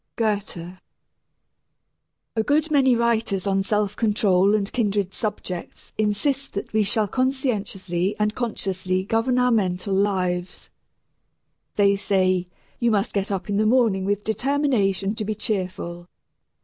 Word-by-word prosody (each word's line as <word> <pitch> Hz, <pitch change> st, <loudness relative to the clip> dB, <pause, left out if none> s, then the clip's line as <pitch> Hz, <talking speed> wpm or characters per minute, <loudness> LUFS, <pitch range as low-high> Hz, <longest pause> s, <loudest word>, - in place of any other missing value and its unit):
GOETHE. 195 Hz, -5 st, -2 dB, 1.6 s
A 220 Hz, -, +2 dB
good 305 Hz, +5 st, +1 dB
many 265 Hz, -4 st, +4 dB
writers 230 Hz, -5 st, 0 dB
on 195 Hz, -1 st, +1 dB
self 205 Hz, 0 st, 0 dB
control 205 Hz, -3 st, +3 dB
and 200 Hz, -1 st, -1 dB
kindred 205 Hz, -5 st, 0 dB
subjects 205 Hz, -5 st, -5 dB
insist 255 Hz, +7 st, 0 dB
that 200 Hz, -, -5 dB
we 220 Hz, -, +3 dB
shall 210 Hz, +1 st, +1 dB
conscientiously 205 Hz, -8 st, -1 dB
and 210 Hz, 0 st, +1 dB
consciously 185 Hz, -6 st, -2 dB
govern 225 Hz, +5 st, +1 dB
our 250 Hz, 0 st, +3 dB
mental 195 Hz, -3 st, 0 dB
lives. 185 Hz, -2 st, -1 dB, 1.0 s
They 200 Hz, -1 st, +4 dB
say, 185 Hz, -2 st, +1 dB, 0.3 s
"You 235 Hz, -, +2 dB
must 210 Hz, -1 st, 0 dB
get 200 Hz, -1 st, -1 dB
up 195 Hz, -2 st, -3 dB
in 200 Hz, -1 st, -1 dB
the 215 Hz, +1 st, +3 dB
morning 225 Hz, -5 st, +3 dB
with 205 Hz, +1 st, -1 dB
determination 220 Hz, -5 st, +1 dB
to 215 Hz, -, -3 dB
be 215 Hz, +1 st, -2 dB
cheerful." 185 Hz, -5 st, -3 dB
205 Hz, 130 wpm, -23 LUFS, 190-225 Hz, 1.6 s, many